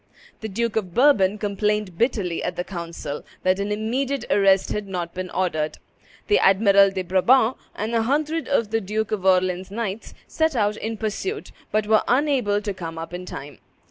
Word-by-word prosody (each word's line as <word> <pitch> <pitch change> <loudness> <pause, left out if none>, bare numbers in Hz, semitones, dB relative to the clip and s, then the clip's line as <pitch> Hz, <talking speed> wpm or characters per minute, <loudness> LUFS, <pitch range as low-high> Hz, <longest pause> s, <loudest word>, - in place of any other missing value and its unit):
The 220 - -5
Duke 230 +2 -2
of 185 -5 -3
Bourbon 215 -8 +4
complained 210 -2 -1
bitterly 200 -5 0
at 180 - -3
the 175 - -2
council 170 -5 -6 0.2
that 185 +1 +2
an 200 +1 -2
immediate 255 +6 -1
arrest 195 -1 +4
had 210 -1 -3
not 175 -3 -4
been 185 0 -5
ordered. 155 -5 -1 0.5
The 415 - +3
Admiral 195 0 +5
de 190 -1 -3
Brabant, 220 +7 +3 0.2
and 220 +3 -3
a 230 - +3
hundred 300 +5 0
of 230 -6 +1
the 225 0 +1
Duke 215 +2 -2
of 195 -3 -1
Orleans' 185 0 +2
knights, 210 0 -5
set 320 -2 0
out 210 -2 +1
in 220 +1 -4
pursuit, 300 - -4 0.2
but 215 0 +1
were 215 0 +4
unable 250 -6 +2
to 205 -1 -2
come 165 -3 -7
up 165 +1 -7
in 180 +1 -6
time. 145 -2 -8
205 Hz, 180 wpm, -23 LUFS, 185-225 Hz, 0.5 s, Admiral